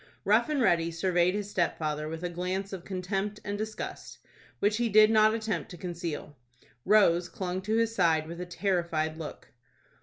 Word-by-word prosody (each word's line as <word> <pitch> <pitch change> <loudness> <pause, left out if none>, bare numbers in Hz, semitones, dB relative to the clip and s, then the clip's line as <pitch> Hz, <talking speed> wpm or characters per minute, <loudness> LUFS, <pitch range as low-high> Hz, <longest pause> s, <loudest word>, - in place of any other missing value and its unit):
Rough 220 +7 +3
and 300 -2 0
Ready 170 -5 +3
surveyed 175 +2 +1
his 205 -1 -4
stepfather 155 -4 -1
with 160 +2 -6
a 175 - -1
glance 185 +3 -3
of 185 -3 -6
contempt 195 +2 -3
and 205 - -2
disgust, 215 +1 -6 0.4
which 210 +1 +1
he 240 -1 +1
did 215 +1 +6
not 215 0 +5
attempt 220 -6 -3
to 175 - -9
conceal. 170 -4 -5 0.5
Rose 180 -4 +4
clung 185 0 -4
to 215 +3 -1
his 230 0 +1
side 165 -6 +2
with 170 +2 -7
a 180 - -5
terrified 170 -4 -1
look. 155 - -8
185 Hz, 175 wpm, -29 LUFS, 170-210 Hz, 0.5 s, did